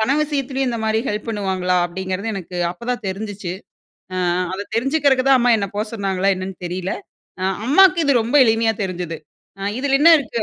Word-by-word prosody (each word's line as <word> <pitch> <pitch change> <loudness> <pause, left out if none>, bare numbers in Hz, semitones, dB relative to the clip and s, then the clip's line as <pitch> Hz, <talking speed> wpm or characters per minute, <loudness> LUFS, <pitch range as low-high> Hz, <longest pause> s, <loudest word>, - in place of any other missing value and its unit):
பண 220 +5 +1
விஷயத்திலயும் 270 -3 -1
இந்த 235 - -2
மாதிரி 220 0 +1
ஹெல்ப் 210 +2 -3
பண்ணுவாங்களா? 190 -4 -1
அப்படிங்கிறது 190 +4 -4
எனக்கு 180 -1 -7
அப்பதான் 240 +5 -4
தெரிஞ்சிச்சு. 200 -2 -5 0.6
அ - - -3 0.4
அத 195 +2 -3
தெரிஞ்சுக்கிறக்கு 270 +1 +2
தான் 270 -1 +6
அம்மா 245 +1 +3
என்ன 200 - -1
போ 210 - 0
சொன்னாங்களா 195 -3 -1
என்னென்னு 185 0 -6
தெரில. 180 +2 -3 0.5
அ - - -4 0.2
அம்மாவுக்கு 355 +5 +5
இது 280 -1 +3
ரொம்ப 240 +6 -4
எளிமையா 225 0 +2
தெரிஞ்சுது. 175 -3 -4 0.6
இதில 275 +1 0
என்ன 335 +3 +8
இருக்கு 235 -5 -3
220 Hz, 165 wpm, -20 LUFS, 190-260 Hz, 0.6 s, என்ன